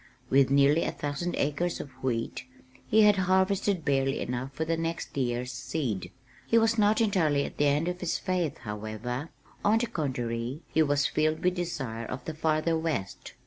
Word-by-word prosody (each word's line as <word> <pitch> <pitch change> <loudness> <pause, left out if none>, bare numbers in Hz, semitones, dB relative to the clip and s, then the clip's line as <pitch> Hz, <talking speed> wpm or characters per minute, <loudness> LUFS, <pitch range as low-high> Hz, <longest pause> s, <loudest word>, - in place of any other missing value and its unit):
With 135 0 +5
nearly 140 +3 +4
a - - -1
thousand 145 +5 -3
acres 165 +5 -1
of 140 - -7
wheat, 120 -1 -2 0.4
he 220 0 +5
had 210 -1 +6
harvested 190 -1 +2
barely 135 -1 +1
enough 125 +2 -3
for 155 +4 -3
the 165 +1 0
next 165 0 -4
year's 125 -2 -1
seed. 125 - -3 0.4
He 230 - +4
was 225 0 +4
not 215 +1 +3
entirely 160 -10 +2
at - - -8
the 145 - +3
end 145 +4 +2
of 180 0 -2
his 180 -2 -1
faith, 180 -6 -1
however; 110 +7 -5 0.3
on 210 +2 +4
the 235 - +1
contrary, 125 - -3
he 160 - +4
was 145 -2 +2
filled 155 +1 +1
with 180 0 +3
desire 135 -11 -4
of 125 0 -6
the 160 - -4
farther 155 +1 +1
west. 160 -12 -3
150 Hz, 180 wpm, -28 LUFS, 130-175 Hz, 0.4 s, had